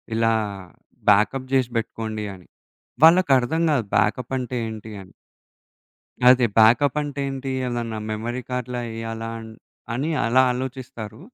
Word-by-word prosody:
ఇలా 115 0 +2 0.8
బ్యాకప్ 110 +6 +3
జేసి 130 -3 +2
బెట్టుకోండి 110 -1 -4
అని. 90 -2 -15 0.6
వాళ్ళకి 165 -1 +6
అర్థం 145 +7 -1
కాదు. 135 -6 +1
బ్యాకపంటే, 125 +4 -1
ఏంటి 110 0 -8
అని. 95 - -15 1.2
అదే, 125 -1 +6
బ్యాకపంటే 140 +5 +3
ఏంటి? 135 0 -5 0.2
ఏదన్నా 120 -2 -3
మెమరీ 120 +4 -3
కార్డ్‌లా 125 -1 -3
ఎయ్యాలాన్ 115 0 -6 0.5
అని 140 +7 -1 0.2
అలా 125 +3 +4
ఆలోచిస్తారు. 125 -3 -6
120 Hz, 110 wpm, -23 LUFS, 110-130 Hz, 1.2 s, వాళ్ళకి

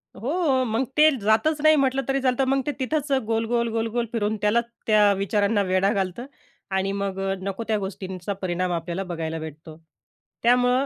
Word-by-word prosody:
हो, 275 - 0
मग 225 +2 0
ते 305 +1 +7
जातच 225 +9 +2
नाही, 310 +1 +6
म्हटलं 270 -2 +2
तरी 270 0 0
चालतं, 255 0 +2
मग 270 0 +2
ते 295 - 0
तिथंच 290 +2 -1
गोल, 225 +1 0
गोल, 235 0 0
गोल, 225 0 -1
गोल, 240 -1 +1
फिरवून 220 -2 -1
त्याला, 210 +3 +3 0.3
त्या 210 -2 +5
विचारांना 200 +2 +1
वेढा 190 +2 +3
घालतं. 195 +4 -2 0.5
आणि 195 +1 0
मग 200 -1 -3 0.2
नको 195 +3 -4
त्या 220 -1 +1
गोष्टींचा 190 -1 -5
परिणाम 180 0 -1
आपल्याला 170 +2 -3
बघायला 165 -1 -3
भेटतो. 155 0 -9 0.7
त्यामुळं 245 +2 +3
220 Hz, 170 wpm, -24 LUFS, 190-255 Hz, 0.7 s, ते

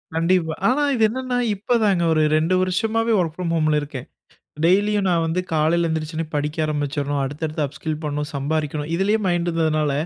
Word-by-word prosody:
கண்டிப்பா. 165 -1 +1
ஆனா, 280 +4 +2
இது 225 - +1
என்னன்னா 255 +1 -2 0.2
இப்ப 220 +5 0
தாங்க 190 -5 +2
ஒரு 155 - +2 0.2
2 165 +4 +1
வருஷமாவே 225 +5 0
ஒர்க் 165 -3 -1
ஃபிரம் 170 -2 -2
ஹோம்ல 155 -2 +2
இருக்கேன். 140 -3 -7 0.6
டெய்லியும் 200 +3 +3
நான் 170 -2 +2
வந்து 165 +3 0
காலையில 165 +2 +2
எந்திரிச்ச 160 0 -3
உடனே 165 +1 -2
படிக்க 150 +2 -2
ஆரம்பிச்சர்ணும், 145 -1 -2
அடுத்தடுத்த 150 +3 -3
அப்ஸ்கில் 155 +2 -5
பண்ணனும், 150 0 -3
சம்பாரிக்கணும் 150 +1 -2
இதுலயே 200 +5 +1
மைண்ட் 175 -1 0
இருந்ததுனால 155 -3 +1
160 Hz, 165 wpm, -22 LUFS, 150-185 Hz, 0.6 s, டெய்லியும்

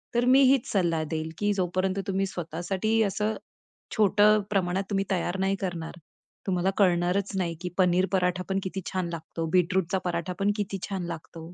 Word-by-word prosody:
तर 240 +1 +3
मी 260 +2 +6
हीच 270 -3 +3
सल्ला 170 -5 +1
देईल, 160 0 -3
की 205 0 +1
जो 185 -2 0
पर्यंत 190 +1 +1
तुम्ही 195 0 0
स्वतःसाठी 185 +6 -1
असं 210 +2 -1 0.6
छोटं 210 +1 +5
प्रमाणात 190 -1 0
तुम्ही 195 -1 0
तयार 180 0 0
नाही 195 +1 +1
करणार. 175 -2 -4 0.5
तुम्हाला 185 0 +1
कळणारच 180 +1 +2
नाही 170 -3 -1
की 180 - -3
पनीर 185 0 +4
पराठापण 185 +1 0
किती 190 0 -4
छान 185 -2 -2
लागतो. 165 0 -5
बीटरूटचा 185 +1 +2
पराठापण 180 +4 -1
किती 200 -1 -2
छान 190 -2 -3
लागतो. 165 0 -8
185 Hz, 160 wpm, -27 LUFS, 175-195 Hz, 0.6 s, मी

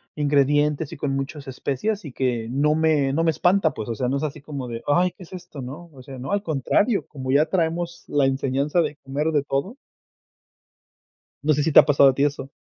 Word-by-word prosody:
ingredientes 145 +1 +1
y 165 - -8
con 135 -1 -2
muchos 135 +1 -5
especias, 145 - -3
y 145 - -7
que 120 -4 -1
no 145 +4 +2
me 155 -4 +2
no 165 +3 +1
me 165 - +3
espanta, 175 +1 +2
pues, 110 - -6
o 115 - -2
sea, 125 +3 -1
no 135 - 0
es 140 - -4
así 150 -2 -4
como 140 -3 -6
de: 115 -1 -6
"Ay, 175 +5 +3
¿qué 185 - -14
es 175 - -15
esto, 175 -6 -9
no?". 150 +7 -8
O 130 -2 -13
sea, 135 -1 -10
no, 130 - -5
al 200 0 0
contrario, 170 - +1
como 130 -3 -5
ya 145 +3 +4
traemos 170 0 -2
la 145 -2 +2
enseñanza 135 +4 +1
de 155 - -2
comer 140 +2 -3
de 145 -3 +1
todo. 140 - -3 1.7
¿No 155 +1 +3
sé 145 0 0
si 160 - +1
te - - +9
ha - - +6
pasado 140 -2 +5
a - - +1
ti 140 - 0
eso? 145 -1 -2
145 Hz, 230 wpm, -23 LUFS, 135-160 Hz, 1.7 s, te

